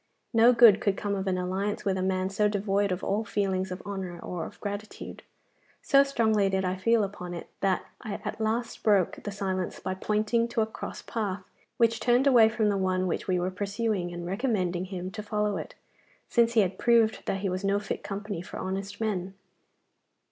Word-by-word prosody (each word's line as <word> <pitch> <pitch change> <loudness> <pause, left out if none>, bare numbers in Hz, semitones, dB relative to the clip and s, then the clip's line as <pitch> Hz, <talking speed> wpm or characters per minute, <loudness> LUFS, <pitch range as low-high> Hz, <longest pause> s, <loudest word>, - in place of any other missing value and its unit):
No 230 +2 +7
good 230 -4 +7
could 200 -2 +1
come 205 -1 -2
of 195 -1 -2
an 185 -1 +1
alliance 190 +3 -2
with 195 -1 +1
a 190 - -2
man 185 0 0
so 210 +2 +2
devoid 200 -1 0
of 180 +1 -3
all 210 +3 0
feelings 190 -3 -1
of 185 0 -6
honour 190 -4 -5
or 175 -2 -4
of - - -14
gratitude. 205 +1 -6 0.6
So 275 - +6
strongly 220 -7 +2
did 190 0 0
I 185 0 0
feel 225 +3 +2
upon 180 -3 -5
it 170 - -9
that 190 -2 +1 0.2
I 210 -2 -4
at - - -4
last 230 +2 -1
broke 200 -5 +2
the 205 - -5
silence 190 -2 -3
by 185 - -3
pointing 215 +4 +1
to 235 -1 0
a - - +3
cross 220 - -7
path, 205 -4 -3 0.3
which 230 -1 +3
turned 245 +3 +3
away 240 -5 +7
from 220 -2 +1
the 200 - +1
one 185 -1 +1
which 180 - -2
we 185 -2 +1
were 180 +1 -1
pursuing, 200 -1 -2
and 175 0 -6
recommending 185 -3 -1
him 185 -1 -5
to 210 +1 -6
follow 210 -1 -1
it, - - -7 0.5
since 235 -1 +3
he 225 - +5
had 190 -1 -1
proved 230 -2 +3
that 195 - -1
he 195 - 0
was 185 +2 -3
no 200 +1 +2
fit 205 - -4
company 200 -2 -4
for 180 - -8
honest 195 +2 -4
men. 195 -4 -2
200 Hz, 205 wpm, -28 LUFS, 185-220 Hz, 0.6 s, No